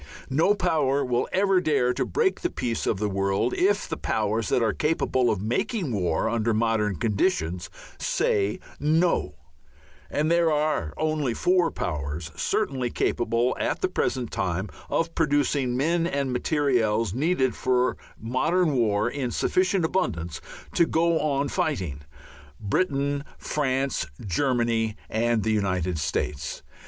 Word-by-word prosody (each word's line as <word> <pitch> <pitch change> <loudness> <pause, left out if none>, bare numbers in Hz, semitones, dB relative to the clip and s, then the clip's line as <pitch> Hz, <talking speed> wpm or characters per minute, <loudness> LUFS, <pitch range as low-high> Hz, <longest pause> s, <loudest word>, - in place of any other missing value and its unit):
No 165 +9 +3
power 155 -7 +1
will 120 -1 0
ever 195 -1 +3
dare 125 -7 +2
to - - -1
break 430 -4 +1
the 350 - 0
peace 115 - -2
of 105 - +1
the 105 +2 -1
world 100 +4 0
if 200 +2 +2
the - - -3
powers 110 +1 -1
that 120 - +2
are 110 -2 +1
capable 140 -5 +1
of 100 -2 -1
making 145 - -1
war 90 -2 0
under 115 -1 +1
modern 110 -3 +1
conditions 90 - 0 0.3
say 100 0 0 0.2
"No." 160 +4 +1 0.7
And 155 +2 0
there 170 -1 +3
are 150 - 0
only 155 -6 0
four 180 -2 +3
powers 75 - -4
certainly 130 -3 -1
capable 120 +1 0
at - - -1
the - - +2
present 125 -3 -1
time 95 +3 -2 0.2
of 165 0 0
producing 145 -4 +1
the - - -1
men 165 +4 +1
and 140 -4 -1
materials 120 - +1
needed 135 -2 +1
for 125 0 +2
a - - -11 0.2
modern 150 +8 +1
war 110 -4 +2
in 130 0 -2
sufficient 185 +6 +1
abundance 85 - -2 0.3
to 170 - +3
go 165 0 +2
on 145 -2 0
fighting: 90 - -2 0.6
Britain, 140 - 0
France, 135 -2 -1
Germany, 115 0 0 0.2
and 115 -1 +1
the 110 - +1
United 90 -5 0
States. 75 0 -3
125 Hz, 140 wpm, -25 LUFS, 105-155 Hz, 0.7 s, No